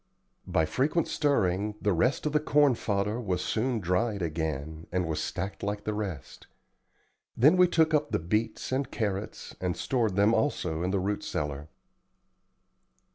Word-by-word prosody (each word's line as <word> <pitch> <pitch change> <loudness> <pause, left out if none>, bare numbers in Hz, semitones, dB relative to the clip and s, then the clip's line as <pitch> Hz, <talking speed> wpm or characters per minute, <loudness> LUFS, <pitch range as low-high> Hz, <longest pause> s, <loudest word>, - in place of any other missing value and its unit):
By 80 - +2
frequent 150 - 0
stirring 105 - +1
the 105 - +1
rest 125 - +1
of 150 - +1
the 150 - +4
corn 145 -2 +4
fodder 105 +1 -1
was 90 -5 -1
soon 120 +1 0
dried 100 +2 0
again, 80 -1 -3
and 90 0 0
was 80 -1 -2
stacked 95 +1 -4
like 105 0 -3
the 105 - -2
rest. 95 -10 -6 0.9
Then 150 +9 +6
we 180 0 +6
took 160 -2 +2
up 150 -1 +2
the - - +1
beets 105 +11 -2
and 130 0 0
carrots, 105 -4 -4
and 90 -1 -1
stored 115 -7 0
them 100 +3 +4
also 90 - 0
in 90 - 0
the 100 - +1
root 100 +2 -2
cellar. 75 +1 -4
105 Hz, 160 wpm, -28 LUFS, 90-125 Hz, 0.9 s, Then